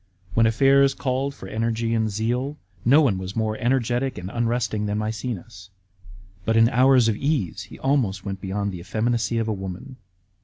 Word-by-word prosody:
When 115 +2 +4
affairs 135 +4 +4
called 135 +1 -2
for 95 - -10
energy 115 +2 -1
and 110 -1 +1
zeal, 120 +7 -2 0.3
no 140 +6 +6
one 105 -9 +1
was 95 +1 -6
more 110 -1 0
energetic 125 +1 0
and 90 +2 -6
unresting 115 -2 -1
than 105 0 -1
Maecenas; 110 -2 -5 0.7
but 110 +3 0
hi 115 0 +6
hours 130 -1 +5
of 110 - +2
ease 105 - -1
he - - -11
almost 120 -9 0
went 95 -1 -5
beyond 100 +1 -2
the 90 - -7
effeminacy 115 +5 -1
of 115 -1 0
a 110 - 0
woman. 95 +6 -7
115 Hz, 170 wpm, -24 LUFS, 100-125 Hz, 0.7 s, no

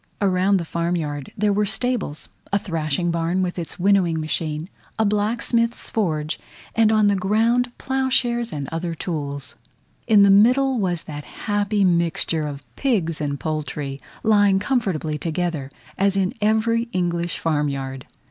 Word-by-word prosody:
Around 195 0 +3
the 170 - -3
farm 170 +2 -1
yard 145 -4 -4
there 210 0 +2
were 210 +1 +2
stables, 200 -8 -2 0.2
a 200 - +3
thrashing 165 -2 -1
barn 170 +3 0
with 180 0 -3
its 165 - -6
winnowing 180 -3 +3
machine, 155 0 -2 0.3
a 220 - +2
blacksmith's 230 +3 0
forge, 155 -7 -1 0.3
and 225 -1 +4
on 215 -1 +4
the 200 - +3
ground 225 +6 +2
ploughshares 255 -3 0
and 140 -3 -4
other 165 +1 -3
tools: 145 -5 -5 0.5
in 210 -3 +6
the 200 - +6
middle 250 +5 +5
was 175 -4 -1
that 145 -1 -7 0.2
happy 205 -1 +1
mixture 170 -3 +1
of 140 -1 -7
pigs 180 - 0
and 140 -1 -2
poultry, 150 -3 -3 0.2
lying 205 -3 +4
comfortably 190 - -1
together, 165 -3 -2 0.3
as 195 0 +2
in 190 -1 +1
every 230 +2 +2
English 175 -1 -1
farm 150 -3 0
yard. 135 -1 -5
180 Hz, 150 wpm, -22 LUFS, 155-215 Hz, 0.5 s, in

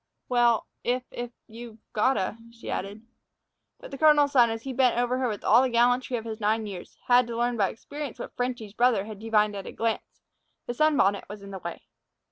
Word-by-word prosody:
"Well, 240 -2 +3 0.2
if 250 +1 0
if 240 0 -5 0.2
you've 230 0 -11 0.2
got 260 +5 +3
t'," 230 +5 -4
she 230 0 -8
added. 205 +4 -5 0.7
But - - -11
the 275 - -7
colonel's 295 -2 +5
son, 245 -4 +5
as 225 0 -4
he 270 - -5
bent 250 -2 +3
over 245 +1 +1
her 260 - +1
with 210 -3 -4
all 235 +3 +6
the 260 - +1
gallantry 245 +1 +2
of 225 - -7
his 220 -1 -5
nine 220 +1 +1
years, 195 -4 -9
had 245 -1 +5
to 230 -1 -5
learn 240 +1 +1
by 200 -4 +2
experience 285 +3 -7
what - - -8
"Frenchy's" 245 -4 -3
brother 235 -4 +2
had 215 -2 -9
divined 215 -1 +1
at 195 - -6
a - - -6
glance: 230 -1 -3 0.4
the 240 - -3
sunbonnet 245 -9 +2
was 205 -1 -9
in 200 - -9
the 190 - -6
way. 170 -1 -7
235 Hz, 215 wpm, -27 LUFS, 215-250 Hz, 0.7 s, all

